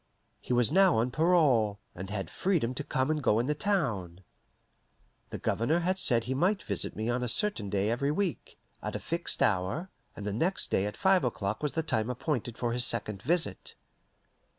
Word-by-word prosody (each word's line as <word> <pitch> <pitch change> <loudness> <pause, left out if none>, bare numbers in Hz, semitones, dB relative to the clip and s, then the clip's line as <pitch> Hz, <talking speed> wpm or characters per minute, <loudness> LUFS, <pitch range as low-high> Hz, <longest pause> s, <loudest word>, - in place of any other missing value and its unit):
He - - -8
was 125 +1 +3
now 190 -3 +5
on 120 +3 +1
parole, 140 - +3 0.2
and 95 +2 -7
had 95 -5 -4
freedom 165 -11 0
to 140 - -4
come 130 +1 0
and 155 -1 -1
go 110 -5 +3
in 120 - +1
the 150 - +1
town. 115 - -1 1.1
The - - -5
Governor 155 +10 0
had 185 +2 0
said 120 -9 +3
he 125 +3 -2
might 185 +9 +1
visit - - -2
me 110 +1 -3
on 120 +1 0
a 125 - -1
certain 120 - 0
day 100 +2 0
every 140 +4 0
week, 180 +2 -2 0.2
at - - -4
a - - -2
fixed - - -1
hour, 95 - 0 0.2
and 100 - -7
the 105 - -2
next 170 - -1
day 95 - +2
at 105 - -6
five 190 -1 +3
o'clock 110 -4 -2
was 150 -2 -1
the 160 - -1
time 110 -7 -1
appointed 125 -2 -3
for 120 -1 -1
his 125 0 +1
second 105 -4 -1
visit. 170 +4 0
125 Hz, 195 wpm, -29 LUFS, 110-165 Hz, 1.1 s, now